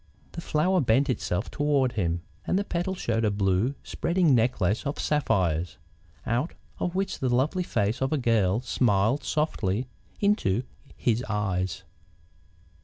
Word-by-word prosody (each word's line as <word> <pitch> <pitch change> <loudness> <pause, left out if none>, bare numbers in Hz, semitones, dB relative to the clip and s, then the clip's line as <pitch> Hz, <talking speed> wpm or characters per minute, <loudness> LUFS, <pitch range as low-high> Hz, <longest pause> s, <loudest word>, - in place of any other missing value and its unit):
The 170 - -6
flower 175 +4 +2
bent 130 +2 +3
itself 100 -3 -2
toward 145 -4 +1
him, 85 -6 -1 0.2
and - - +2
the 200 - +1
petals 185 0 -2
showed 115 -6 0
a 110 - +3
blue, 100 +5 +1
spreading 170 -4 +1
necklace 115 -4 +2
of 140 - -3
sapphires, 90 - 0 0.5
out 120 +8 -1 0.2
of 180 0 -2
which 195 +1 -1
the 130 - 0
lovely 135 +9 +1
face 110 - -1
of 135 - 0
a 155 - +2
girl 115 -5 +2
smiled 120 0 +1
softly 125 -8 0 0.3
into 130 - +2 0.3
his 120 0 +1
eyes. 95 -3 -1
120 Hz, 140 wpm, -27 LUFS, 100-150 Hz, 0.5 s, bent